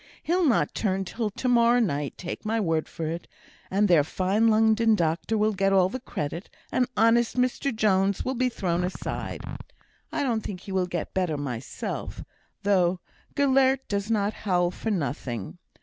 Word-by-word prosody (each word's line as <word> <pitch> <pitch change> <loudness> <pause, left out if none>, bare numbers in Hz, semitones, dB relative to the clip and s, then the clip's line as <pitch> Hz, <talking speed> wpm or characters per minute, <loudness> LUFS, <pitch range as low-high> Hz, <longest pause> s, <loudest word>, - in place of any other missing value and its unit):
He'll 350 0 +2
not 245 - +2
turn 195 -2 -1
till 220 +4 -2
to 230 +5 -4
morrow 240 0 +5
night, 150 - -1
take 175 - -6
my 225 +1 0
word 165 -6 0
for 165 - -5
it, 165 +2 -4 0.4
and 205 +2 +2
their 170 -5 +5
fine 195 +8 +1
London 220 0 +4
doctor 170 +5 0
will 215 +1 +2
get 195 0 +1
all 185 -1 +4
the 255 - -4
credit, 170 - -5 0.2
and 250 - +2
honest 230 +3 +3
Mr 255 +2 +1
Jones 200 -3 +1
will 260 - 0
be 255 0 +1
thrown 180 -6 -1
aside. 180 +1 -4 0.7
I 290 - -1
don't 235 -5 0
think 190 -3 -6
he 195 - -9
will 185 -1 +1
get 175 -2 -4
better 180 -5 0
myself, 130 -4 -5 0.4
though 185 -3 +2 0.4
Gelert 270 -1 +3
does 200 +1 -2
not 210 -1 +1
howl 180 -5 0
for 225 - -4
nothing. 140 - -3
200 Hz, 170 wpm, -26 LUFS, 175-230 Hz, 0.7 s, morrow